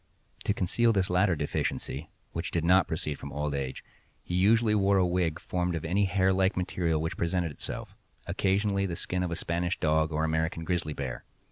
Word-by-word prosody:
To - - +2
conceal 115 +6 +2
this 95 -4 +1
latter 90 0 +3
deficiency, 75 0 -2 0.2
which 85 +1 -3
did 85 - -1
not 90 +1 +5
proceed 80 -3 -3
from 70 - -7
old 75 0 -2
age, 70 -2 -3 0.4
he - - -6
usually 105 +4 +4
wore 100 -1 +3
a 95 - +4
wig 85 -3 0
formed 90 -1 -1
of 80 - -4
any 100 +5 +2
hair 95 0 +2
like 95 +1 +2
material 90 -3 0
which 80 +1 -3
presented 85 -1 0
itself—occasionally 100 +6 -2
the 85 - -3
skin 90 +1 -2
of 90 - -1
a 85 - -2
Spanish 85 +2 -1
dog 80 0 +2
or 80 +1 0
American 80 +1 0
grizzly 85 -3 -1
bear. 65 -3 -5
90 Hz, 190 wpm, -29 LUFS, 80-95 Hz, 0.4 s, not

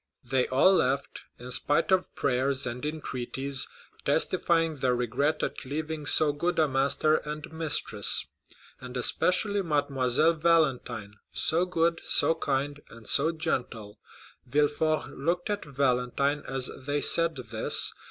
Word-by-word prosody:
They 130 +1 -1
all 140 +9 +3
left, 135 -5 -1 0.2
in 125 +1 -10
spite 145 +8 +3
of 190 -1 0
prayers 135 +1 -1
and 125 0 -6
entreaties, 140 -3 -2 0.4
testifying 165 -2 +1
their 125 -2 0
regret 125 +6 -1
at - - -4
leaving 150 +2 -5
so 155 -2 +5
good 170 +4 -2
a 155 -1 +3
master 140 +3 +1
and 150 +1 -8
mistress, 150 -10 +2 0.5
and 125 0 -8
especially 200 - +3
Mademoiselle 145 -2 +1
Valentine, 135 -10 0
so 170 +3 +1
good, 170 -2 -1
so - - +3
kind, 145 -2 -3
and 115 -1 -14
so 155 +4 +3
gentle. 115 -9 -4 0.5
Villefort 150 +3 0
looked 175 +7 -3
at 205 -4 -4
Valentine 140 +1 -1
as 135 -1 -1 0.2
they 145 0 -1
said 165 -1 +5
this. 115 -4 0
145 Hz, 130 wpm, -27 LUFS, 125-160 Hz, 0.5 s, so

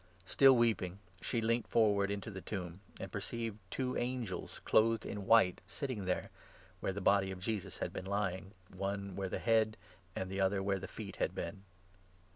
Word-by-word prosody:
Still 135 +6 +6
weeping, 105 -6 +2 0.2
she 115 +5 0
leant 115 +1 +1
forward 100 -3 +3
Mary. 100 0 -1
jnto 110 - -7
tne 95 - -6
tomb, 90 -3 -5 0.2
and - - -6
perceived 115 -2 -3
two 130 -1 -1
angels 120 -5 -3
clothed 115 +1 +4
12 - - -5
in 100 -1 -5
white 115 -6 +5
sitting 110 -1 -4
there, 90 - -1 0.5
where - - -1
the 100 - -4
body 100 0 +4
of 95 -1 -5
Jesus 105 0 -3
had - - -3
been 95 - -5
lying, 100 0 -2 0.2
one 100 0 -3
where 95 -1 -2
the - - -2
head 110 -1 +2 0.4
and 95 0 -3
the 95 0 -1
other 95 0 +2
where 100 0 +1
the 95 - -6
feet 100 -2 -7
had - - 0
been. 95 +3 -5
100 Hz, 190 wpm, -35 LUFS, 95-115 Hz, 0.5 s, Still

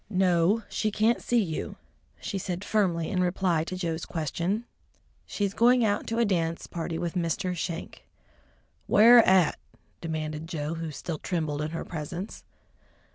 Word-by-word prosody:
"No, 185 +2 +2
she 215 - -1
can't 220 +3 +2
see 240 -2 +2
you," 160 -4 -4 0.4
she 195 - -4
said 180 +1 -4
firmly 180 -6 +1
in 185 -2 +1
reply 180 -2 +1
to 185 - -5
Joe's 165 -3 -3
question. 170 - -2 0.6
"She's 200 -1 -2
going 240 +1 +4
out 205 -1 0
to 230 - -2
a 235 - +3
dance 165 -4 -1
party 165 -1 -4
with 170 -1 -3
Mr. 180 +1 -1
Schenk." 170 0 -5 0.8
"Where 235 +4 +8
at?" 185 -4 +4 0.4
demanded 155 -1 -4
Joe, 155 -2 -3
who 165 -1 -4
still 155 +1 -5
trembled 155 -5 -2
in 150 - -2
her 165 - -5
presence. 170 +4 -6
175 Hz, 150 wpm, -27 LUFS, 165-205 Hz, 0.8 s, Where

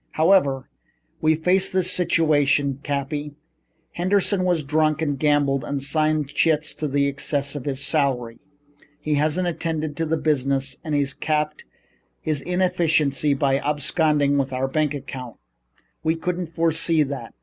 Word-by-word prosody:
"However, 155 -6 +3 0.5
we 155 0 +3
face 180 +4 +1
this 185 -1 +1
situation, 145 -6 +2
Cappy. 145 +1 -3 0.6
Henderson 185 +1 +1
has 170 -4 +1
drunk 155 +1 +1
and 145 -4 -1
gambled 145 -3 +2
and 140 -1 -3
signed 155 +1 0
chits 155 +1 +1
in 145 -2 -2
excess 140 0 0
of 140 - -6
his 140 -1 -2
salary. 130 -7 0 0.6
He 150 - -2
hasn't 155 +5 +1
attended 160 -3 -3
to 165 - 0
business 135 -3 0
and 155 -2 -2
he's 140 -1 0
capped 150 0 -2 0.5
his 150 -3 -2
inefficiency 160 -6 +1
by 135 0 +1
absconding 145 0 +1
with 135 -1 -1
our 130 +1 -1
bank 150 +1 0
account. 130 -3 -7 0.7
We 160 +1 +1
couldn't 170 0 -4
foresee 165 -1 +2
that. 135 -5 -6
150 Hz, 135 wpm, -23 LUFS, 140-160 Hz, 0.7 s, However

